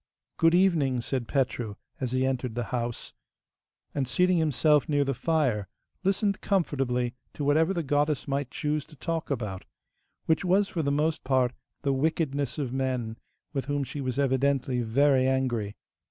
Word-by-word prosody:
'Good 165 +1 +5
evening,' 160 -9 +3
said 125 -1 -2
Petru 125 -6 -1 0.2
as 130 -3 -2
he 130 0 +1
entered 130 -3 -1
the 120 - -1
house, 120 -1 -3 0.8
and, 135 -3 -1
seating 180 +7 +3
himself 150 0 +3
near 145 -1 +3
the 135 - 0
fire, 125 - 0 0.4
listened 200 +1 +1
comfortably 130 -10 0 0.2
to 145 - -3
whatever 155 +5 +3
the 175 -3 -1
goddess 145 0 +1
might 140 -1 -1
choose 150 +1 -1
to 155 - -16
talk 165 +2 -3
about, 105 -9 -3 0.6
which 160 +3 +2
was 195 +2 +3
for 170 - -2
the 140 -2 0
most 150 +2 0
part 130 -1 +2 0.3
the 140 - +2
wickedness 140 -2 0
of 135 -5 -2
men, 130 -4 -1 0.4
with 135 -2 -2
whom 145 0 -1
she 140 +2 -5
was 130 -1 -2
evidently 135 -2 +1
very 130 +3 +3
angry. 120 -6 0
140 Hz, 160 wpm, -28 LUFS, 125-155 Hz, 0.8 s, Good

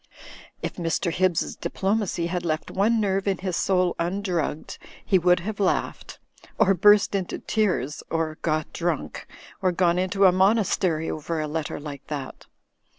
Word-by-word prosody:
If - - -4
Mr. 170 0 -1
Hibbs's 180 -1 0
diplomacy 190 0 -1
had 175 0 -2
left 155 -2 -2
one 220 +4 +2
nerve 195 -1 0
in 195 -2 +1
his 185 -1 -3
soul 185 -2 +1
undrugged, 175 -3 -2 0.3
he 190 - +3
would 180 0 +3
have 210 +3 -5
laughed, 195 -2 -1 0.4
or 195 -3 +4
burst 205 +3 +5
into 190 -3 -2
tears, 180 - -1
or 160 -1 -2
got 155 -1 -1
drunk, 170 -3 -3 0.3
or 185 -2 +2
gone 175 0 +2
into 190 +2 +2
a 185 - +7
monastery 185 -4 +2
over 155 +1 -3
a 155 - -2
letter 155 0 -3
like 145 -2 -8
that. 140 -3 -6
180 Hz, 150 wpm, -25 LUFS, 165-195 Hz, 0.4 s, a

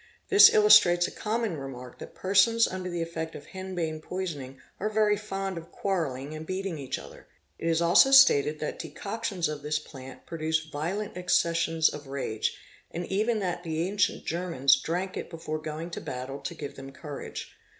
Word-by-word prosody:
This 400 +1 +9
illustrates 210 -5 +6
a - - -8
common 220 -5 -2
remark 125 -3 -8
that - - -10
persons 200 +5 +4
under 185 0 -5
the 175 -1 -2
effect 160 -1 -5
of - - -9
henbane 175 -5 -4
poisoning 150 -8 -5 0.2
are 215 - -1
very 215 -1 +3
fond 195 -3 -4
of 165 +1 -15
quarrelling 150 -7 -2
and 155 0 -6
beating 185 -1 -4
each 135 -2 -4
other. - - -12 0.3
It 165 - -3
is 165 0 +2
also 175 +10 +6
stated 420 +12 +6
that - - -4
decoctions 185 - -3
of 150 -1 -5
this 150 +1 -1
plant 135 -4 -11
produce 160 -1 -1
violent 180 +8 -4
accessions 165 -2 +2
of 150 -1 -5
rage, 135 -5 -2 0.3
and 175 +1 -5
even 215 +4 +1
that 175 -2 -2
the 165 0 -2
ancient 205 +1 0
Germans 165 -5 +2
drank 180 +3 -3
it - - -5
before 160 -2 -5
going 155 +2 -6
to - - -5
battle 130 +2 -6
to 140 +5 -6
give 145 -3 -7
them 135 0 -9
courage. 145 0 -8
170 Hz, 175 wpm, -28 LUFS, 155-195 Hz, 0.3 s, This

